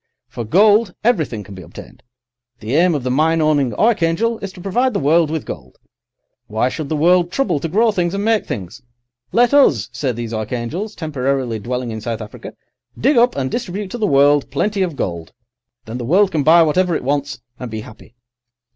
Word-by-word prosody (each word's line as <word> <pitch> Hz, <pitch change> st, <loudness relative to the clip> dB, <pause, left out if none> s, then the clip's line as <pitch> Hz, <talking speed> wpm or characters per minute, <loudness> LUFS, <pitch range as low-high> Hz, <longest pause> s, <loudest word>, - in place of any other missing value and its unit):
"For 120 Hz, -, -6 dB
gold, 205 Hz, -, +3 dB
everything 155 Hz, -, 0 dB
can 100 Hz, +1 st, -12 dB
be 95 Hz, -, -9 dB
obtained. -, -, -13 dB, 0.6 s
The 110 Hz, +4 st, -5 dB
aim 170 Hz, +2 st, +3 dB
of 140 Hz, -, -3 dB
the 125 Hz, -, -1 dB
mine 160 Hz, +5 st, +2 dB
owning 150 Hz, -5 st, +2 dB
archangel 220 Hz, +1 st, +1 dB
is 195 Hz, -, -6 dB
to -, -, -13 dB
provide 230 Hz, +7 st, 0 dB
the -, -, +1 dB
world 160 Hz, +2 st, +3 dB
with 160 Hz, -2 st, -3 dB
gold. 65 Hz, -2 st, -9 dB, 0.7 s
Why 110 Hz, +4 st, 0 dB
should 145 Hz, +1 st, -5 dB
the 155 Hz, -, -1 dB
world 175 Hz, +3 st, +3 dB
trouble 275 Hz, -, 0 dB
to 165 Hz, -, -4 dB
grow 220 Hz, +6 st, +3 dB
things 180 Hz, -2 st, -1 dB
and 200 Hz, +1 st, -2 dB
make 225 Hz, -1 st, +1 dB
things? 95 Hz, +5 st, -6 dB, 0.5 s
'Let 245 Hz, +3 st, +3 dB
us,' 145 Hz, -, +4 dB
say 135 Hz, -3 st, -1 dB
these 115 Hz, -1 st, -5 dB
archangels, 120 Hz, -, -4 dB
temporarily 135 Hz, -6 st, -2 dB
dwelling 125 Hz, +2 st, -4 dB
in 110 Hz, 0 st, -6 dB
South 115 Hz, 0 st, -4 dB
Africa, 105 Hz, -1 st, -9 dB, 0.5 s
'dig 275 Hz, +5 st, +3 dB
up 240 Hz, +1 st, +4 dB
and 130 Hz, -2 st, -2 dB
distribute 205 Hz, -4 st, -4 dB
to 240 Hz, -, -5 dB
the 210 Hz, -, +1 dB
world 145 Hz, -1 st, +3 dB
plenty 205 Hz, -1 st, -1 dB
of 175 Hz, -5 st, -1 dB
gold, 85 Hz, -8 st, -4 dB, 0.5 s
then 115 Hz, +3 st, -6 dB
the -, -, -4 dB
world 190 Hz, -, +3 dB
can 155 Hz, -, 0 dB
buy 165 Hz, +3 st, +6 dB
whatever 175 Hz, +2 st, +1 dB
it -, -, -3 dB
wants, 140 Hz, -1 st, -2 dB, 0.2 s
and 125 Hz, -, -6 dB
be 110 Hz, -1 st, -5 dB
happy. 110 Hz, +2 st, -15 dB
155 Hz, 200 wpm, -18 LUFS, 125-195 Hz, 0.7 s, buy